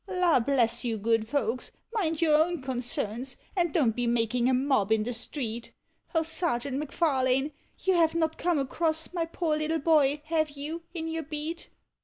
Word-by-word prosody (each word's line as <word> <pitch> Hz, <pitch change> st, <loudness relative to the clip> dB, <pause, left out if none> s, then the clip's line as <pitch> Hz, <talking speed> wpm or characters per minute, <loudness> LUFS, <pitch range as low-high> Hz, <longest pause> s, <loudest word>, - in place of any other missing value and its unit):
La 360 Hz, -6 st, +3 dB
bless 245 Hz, -2 st, +1 dB
you, 230 Hz, -2 st, -1 dB
good 225 Hz, +1 st, +1 dB
folks, 250 Hz, -2 st, -1 dB, 0.2 s
mind 335 Hz, -7 st, 0 dB
your 310 Hz, -2 st, +4 dB
own 330 Hz, +2 st, +2 dB
concerns, 250 Hz, -1 st, -2 dB, 0.2 s
and 345 Hz, -3 st, +2 dB
don't 255 Hz, -10 st, +2 dB
be 245 Hz, -1 st, -1 dB
making 240 Hz, +1 st, +1 dB
a -, -, +3 dB
mob 255 Hz, -6 st, +1 dB
iu 220 Hz, -1 st, +3 dB
the 245 Hz, +3 st, -3 dB
street; 235 Hz, -1 st, -4 dB, 0.4 s
O 325 Hz, -, +3 dB
Sergeant 280 Hz, -5 st, 0 dB
M'Farlaue! 275 Hz, -2 st, +1 dB, 0.3 s
you 380 Hz, -, +3 dB
have 330 Hz, -2 st, +3 dB
not 320 Hz, -1 st, +1 dB
come 345 Hz, -2 st, +1 dB
across 315 Hz, +4 st, -1 dB
my 340 Hz, -2 st, 0 dB
poor 330 Hz, -1 st, -1 dB
little 310 Hz, +1 st, 0 dB
boy, 295 Hz, -2 st, +3 dB
have 315 Hz, -1 st, +1 dB
you, 295 Hz, +4 st, -5 dB
in 325 Hz, -1 st, -3 dB
your 325 Hz, 0 st, -2 dB
beat? 310 Hz, +2 st, -5 dB
295 Hz, 175 wpm, -28 LUFS, 245-325 Hz, 0.4 s, your